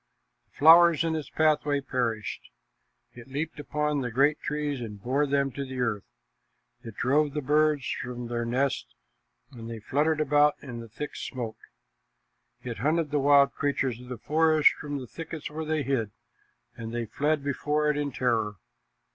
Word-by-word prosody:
The - - -29
flowers 165 +1 +7
in 165 -1 0
its 155 -2 -5
pathway 150 -2 +2
perished. 120 -5 -3 0.6
It 120 0 -12
leaped 150 +3 -4
upon 150 0 -1
great 135 +5 +2
trees 145 -2 -3
and 105 -3 -7
bore 135 +7 0
them 140 -1 +1
to 140 - -5
the 130 -1 -6
earth. 110 -5 -1 0.8
It 115 -3 -9
drove 145 +4 +1
the 150 - -1
birds 150 0 +2 0.2
from 125 -1 -6
their 120 0 -2
nests, 125 +3 -1 0.6
and 115 -3 -9
they 115 - -5
fluttered 150 +8 0
about 150 0 +4
in 125 -4 -8
the 115 -1 -9
thick 145 +7 -6
smoke. 120 -4 -5 1.0
It 120 -5 -5
hunted 155 +4 +1
the 145 - +1
wild 140 0 +5
creatures 135 -4 -1
of 125 - -12
the 125 - -5
forest 155 +4 +4
from 145 -1 -5
the 130 - -6
thickets 160 +3 -7
where 160 +1 -5
they 155 -1 0
hid, 125 -5 -1 0.7
and 115 -1 -7
they 120 0 -2
fled 150 +5 0
before 150 +2 0
it 150 - +2
in 145 -1 -2
terror. 115 -5 0
140 Hz, 165 wpm, -27 LUFS, 120-150 Hz, 1.0 s, flowers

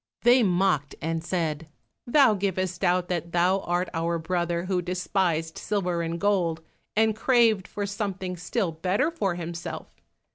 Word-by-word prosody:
They 245 +2 +6
mocked 180 -7 +1
and 165 +1 -2
said, 165 -3 -2 0.4
"Thou 260 -2 +5
givest 185 -2 -2
out 180 0 +2
that 170 -1 -3
thou 180 +3 +3
art 175 0 -1
our 170 0 0
brother 170 +1 -1
who 185 -1 0
despised 180 -2 -1
silver 180 -5 -1
and 165 0 -3
gold, 180 -5 +1 0.3
and 220 0 +3
craved 225 -4 +3
for 205 - -4
something 195 -2 -3
still 180 +2 -2
better 185 - 0
for 195 - -1
himself. 170 0 -6
180 Hz, 145 wpm, -26 LUFS, 170-200 Hz, 0.4 s, They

